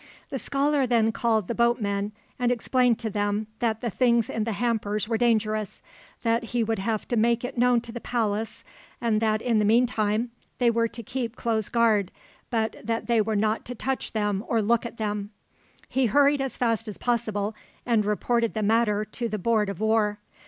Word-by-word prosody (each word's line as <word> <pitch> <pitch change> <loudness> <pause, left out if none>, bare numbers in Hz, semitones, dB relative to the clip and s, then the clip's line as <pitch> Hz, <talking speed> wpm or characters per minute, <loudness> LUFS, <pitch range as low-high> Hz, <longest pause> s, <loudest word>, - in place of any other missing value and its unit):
The 270 - -2
scholar 280 +2 +1
then 230 -2 +3
called 220 -4 +1
the - - -1
boatmen, 210 -4 +1 0.3
and 245 0 +2
explained 245 0 +2
to 230 -2 -3
them 205 +1 0
that 225 -2 0
the 235 - -2
things 235 0 +2
in 220 -1 -1
the 225 - -1
hampers 215 -1 -1
were 230 - 0
dangerous, 215 -2 0 0.4
that 230 0 +1
he 235 0 0
would 225 -1 -1
have 215 +2 -2
to 240 - +1
make 235 +2 +2
it 255 - -6
known 245 -1 +3
to 230 - -8
the 240 0 -7
Palace, 220 -2 -2 0.4
and 225 -2 +1
that 215 -1 +1
in 230 -3 +2
the - - +2
meantime 225 0 +2 0.3
they 240 -2 +3
were 230 0 +2
to 235 +1 -9
keep 245 0 -4
close 220 -4 -1
guard, 220 -5 +2 0.4
but 225 -2 -1
that 230 +1 -2
they 235 -2 +3
were 215 +1 -1
not 215 +2 +1
to 250 - -5
touch 265 +3 -3
them 210 -2 0
or 230 - +1
look 230 +2 +2
at 235 - -12
them. 205 -2 -2 0.6
He 265 -2 +1
hurried 285 +4 +4
as 270 -1 -3
fast 230 -2 0
as 210 - -6
possible, 215 -3 -1 0.3
and 230 -3 +2
reported 230 +3 0
the 215 - -1
matter 215 -1 +2
to 235 +2 -4
the 215 - -2
Board 215 0 +1
of 195 - -5
War. 220 -1 +2
225 Hz, 195 wpm, -26 LUFS, 215-235 Hz, 0.6 s, hurried